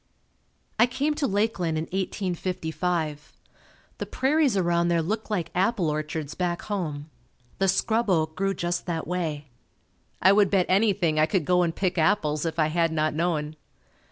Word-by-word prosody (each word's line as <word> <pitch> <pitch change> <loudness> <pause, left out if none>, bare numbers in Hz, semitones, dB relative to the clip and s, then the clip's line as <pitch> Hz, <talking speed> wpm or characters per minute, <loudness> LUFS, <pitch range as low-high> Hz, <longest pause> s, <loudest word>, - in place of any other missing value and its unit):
I 235 - +6
came 275 +5 -1
to 295 -2 -1
Lakeland 195 -5 0
in 155 - -1
1855. 175 -4 -3 0.7
The - - -4
prairies 275 -4 +2
around 170 -2 +2
there 170 -1 +2
looked 215 +8 -2
like 180 -6 -2
apple 185 -3 +1
orchards 155 -1 -4
back 175 -1 -2
home. 155 -7 -4 0.5
The 195 - +2
scrub 220 +4 +1
oak 160 -3 +1
grew 195 0 0
just 175 +1 -2
that 165 -2 -2
way. 155 -5 -3 0.7
I 190 - +6
would 200 -1 +4
bet 190 -3 +3
anything 185 -5 +2
I 155 - +4
could 165 -1 0
go 180 +2 +3
and 170 -2 0
pick 185 -2 -1
apples 155 -3 +1
if 160 0 -4
I 155 -1 +2
had 165 0 +1
not 155 -1 0
known. 155 -2 -1
175 Hz, 160 wpm, -26 LUFS, 155-195 Hz, 0.7 s, I